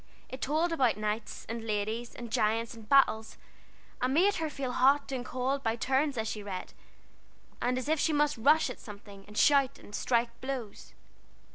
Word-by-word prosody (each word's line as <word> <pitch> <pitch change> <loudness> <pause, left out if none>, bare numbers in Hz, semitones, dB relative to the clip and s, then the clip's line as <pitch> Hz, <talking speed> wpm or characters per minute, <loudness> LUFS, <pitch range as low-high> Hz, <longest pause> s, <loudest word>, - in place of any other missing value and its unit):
It 260 - -8
told 315 +5 +1
about 255 -10 +2
knights, 215 0 -3
and 230 0 -5
ladies, 220 +2 -3
and 240 -2 -8
giants, 225 +2 +1
and 225 -2 -13
battles, 220 -5 +3 0.6
and 255 +1 +1
made 370 +8 +3
her 320 -1 -2
feel 270 -3 -4
hot 275 +3 +3
and 255 -2 -3
cold 260 +2 -2
by 225 -3 0
turns 270 +3 0
as 225 0 -1
she 215 - -4
read, 190 -3 -6 0.9
and 250 +1 +1
as 255 - -3
if 315 0 +1
she 320 - +2
must 295 0 +2
rush 285 +4 +3
at - - -10
something, 200 -2 -11
and 210 0 -11
shout, 275 -2 +4
and 205 - -15
strike 235 +1 0
blows. 255 -5 -6
250 Hz, 180 wpm, -30 LUFS, 220-275 Hz, 0.9 s, shout